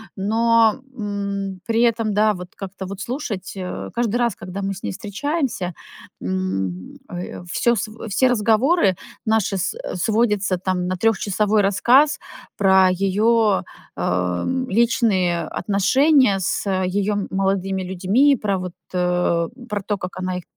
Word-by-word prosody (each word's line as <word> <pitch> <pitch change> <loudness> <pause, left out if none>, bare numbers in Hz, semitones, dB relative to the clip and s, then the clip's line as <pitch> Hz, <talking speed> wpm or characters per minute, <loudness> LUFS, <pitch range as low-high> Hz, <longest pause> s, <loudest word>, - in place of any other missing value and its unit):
Но, 225 +4 +3 0.2
м, 200 -2 -3
при 230 0 +1
этом, 225 -3 +2
да, 210 +1 +3
вот 180 0 -9
как-то 195 0 -7
вот 200 +2 -7
слушать, 235 -7 -4
э, 185 -1 -5
каждый 235 -1 0
раз, 235 -5 +1
когда 190 +2 -7
мы 195 0 -2
с 190 - -11
ней - - -2
встречаемся, 210 - -3 0.5
м, 95 0 -3
э, 175 0 -6
всё 235 0 +2
сво 215 +1 -3 0.2
все 255 +6 +3
разговоры 230 - +3 0.3
наши 220 -3 +1
с 185 - -2 0.2
сводятся 210 -1 +1
там 180 -1 -1
на 185 - -1
трехчасовой 210 0 +2
рассказ 245 +9 +4 0.4
про 190 -1 +5
ее, 205 +3 +2 0.3
эм, 90 - -1
личные 195 -6 +2 0.2
отношения 255 +2 +3
с, 190 - -1
э, 190 -1 +1
ее 205 +2 0
молодыми 190 0 0
людьми, 195 +10 +3
про 200 -2 0
вот, 180 -1 -6 0.2
э, 180 -2 +1 0.2
про 205 -1 -2
то, 205 0 -2
как 180 0 -7
она 185 0 -2
их 180 - -7
200 Hz, 140 wpm, -21 LUFS, 185-225 Hz, 0.5 s, про